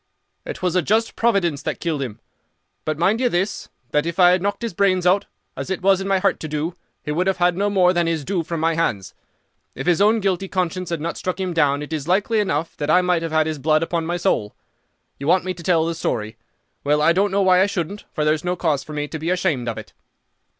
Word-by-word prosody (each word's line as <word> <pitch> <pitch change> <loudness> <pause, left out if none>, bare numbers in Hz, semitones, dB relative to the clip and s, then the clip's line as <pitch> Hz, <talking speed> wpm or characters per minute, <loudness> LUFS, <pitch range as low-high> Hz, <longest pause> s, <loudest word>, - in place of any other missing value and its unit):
"It 190 - -7
was 180 -1 0
a 180 - +4
just 220 +7 +1
providence 190 -11 +1
that - - -4
killed 160 -5 -2
him. 120 -4 -5 0.7
But, 155 -1 -1
mind 200 +8 +2
you 250 - +3
this, 190 0 -2 0.2
that 150 +2 +1
if 170 0 -4
I 180 -1 +7
had 180 0 +2
knocked 205 +4 -2
his 230 - -3
brains 185 -1 +2
out, 195 +3 +3 0.3
as - - -5
it 190 -1 -3
was 195 0 +4
in 195 - -4
my 195 -1 +3
heart 195 +1 +1
to 155 - -5
do, 155 +3 -3 0.3
he 150 - -3
would 175 +5 0
have 190 -1 +1
had 175 -1 +2
no 200 +3 0
more 185 -3 +4
than 175 -1 +1
his 160 -4 -1
due 190 -2 0
from 165 0 -4
my 165 +1 +2
hands. 120 - -1 0.6
If - - -5
his 175 +1 +2
own 215 +2 +4
guilty 195 -1 -1
conscience 185 -1 -2
had 170 -3 -3
not 170 +2 -3
struck 185 0 -3
him 185 -2 -2
down 145 -3 +2
it 150 - -7
is 150 -1 -3
likely 205 +5 +2
enough 165 -6 -1
that 145 0 -3
I 180 +3 +5
might 180 -2 +1
have 165 -1 -4
had 155 0 +3
his 155 -2 -3
blood 155 +3 +2
upon 165 -1 -2
my 175 +1 -1
soul. 140 - 0 0.6
You 140 - -5
want 180 +2 +3
me 185 - -2
to 170 - -11
tell 165 -1 +2
the 170 - -1
story. 110 -8 -3 0.5
Well, 150 +1 +2
I 160 +3 +4
don't 200 +3 +2
know 195 +1 +1
why 185 -1 +5
I 195 - +4
shouldn't, 200 +1 -4
for 150 - -1
there's 155 0 +1
no 180 0 -1
cause 155 -6 0
for 155 - -9
me 150 0 -2
to 160 - -6
be 160 +2 -3
ashamed 170 -10 0
of 115 - -4
it. - - -9
175 Hz, 260 wpm, -21 LUFS, 155-190 Hz, 0.7 s, I